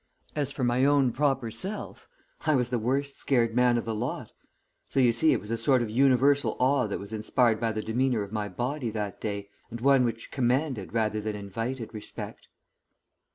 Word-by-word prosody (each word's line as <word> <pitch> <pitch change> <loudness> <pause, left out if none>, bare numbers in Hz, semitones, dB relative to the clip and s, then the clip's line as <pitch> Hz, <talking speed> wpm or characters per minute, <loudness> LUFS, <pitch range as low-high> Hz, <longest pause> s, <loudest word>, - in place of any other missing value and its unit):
As 145 -2 0
for 135 -1 -4
my 120 +1 +2
own 140 -2 +4
proper 135 -3 0
self, 195 - -6 0.4
I 155 - +4
was 125 -2 +1
the 125 -1 0
worst 135 +5 -1
scared 120 -4 +2
man 125 -1 +4
of 120 - -2
the 115 - -2
lot; 110 +3 -4 0.6
so, - - 0
you 125 -3 +5
see, 135 +8 +4
it - - +2
was 105 - -9
a 115 - 0
sort 120 +2 +3
of 110 - -4
universal 135 +3 +3
awe 130 -2 +2
that 100 - -3
was 100 +2 -8
inspired 110 +1 +2
by 115 -1 0
the 110 -1 -3
demeanour 120 -1 0
of 100 - -9
my 105 -2 -2
body 125 +7 -3
that 105 -2 -4
day, 100 -2 -4 0.2
and 115 - -7
one 135 +1 +4
which 115 -1 -3
commanded 130 -4 0
rather 110 -1 0
than 105 0 -3
invited 115 +5 -5
respect." 105 -1 -6
120 Hz, 200 wpm, -27 LUFS, 110-135 Hz, 0.6 s, you